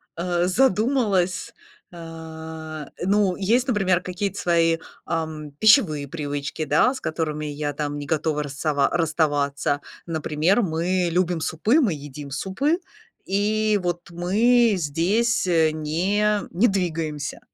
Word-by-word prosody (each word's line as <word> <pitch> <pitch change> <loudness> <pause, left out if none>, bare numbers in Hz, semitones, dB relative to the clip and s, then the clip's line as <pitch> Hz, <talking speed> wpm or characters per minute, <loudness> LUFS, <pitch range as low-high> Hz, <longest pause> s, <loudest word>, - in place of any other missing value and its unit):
А, 175 +1 0
задумалась. 210 -4 +1 0.4
А, 160 -2 -8
ну, 195 -1 +2
есть, 230 +6 +1
например, 195 -7 +2
какие-то 195 +2 -3
свои, 165 -1 +2 0.3
ам, 155 -3 -4
пищевые 180 - +4
привычки, 145 0 -4
да, 155 - +3
с - - -8
которыми 155 -1 -2
я 145 0 -3
там 145 0 -3
не 145 - -6
готова 150 0 0
расава 140 0 0
расставаться. 145 -3 0 0.2
Например, 165 +5 +1
мы 175 0 0
любим 175 -1 0
супы, 210 - +2
мы 210 -10 +2
едим 145 -1 -8
супы, 255 - 0 0.5
и 210 +1 +1
вот 175 -1 -3
мы 220 +7 +3
здесь, 185 +8 +1
э, 160 -3 +3
не 190 +7 0
не 200 +8 +3
двигаемся. 165 -7 -2
170 Hz, 120 wpm, -23 LUFS, 155-200 Hz, 0.5 s, пищевые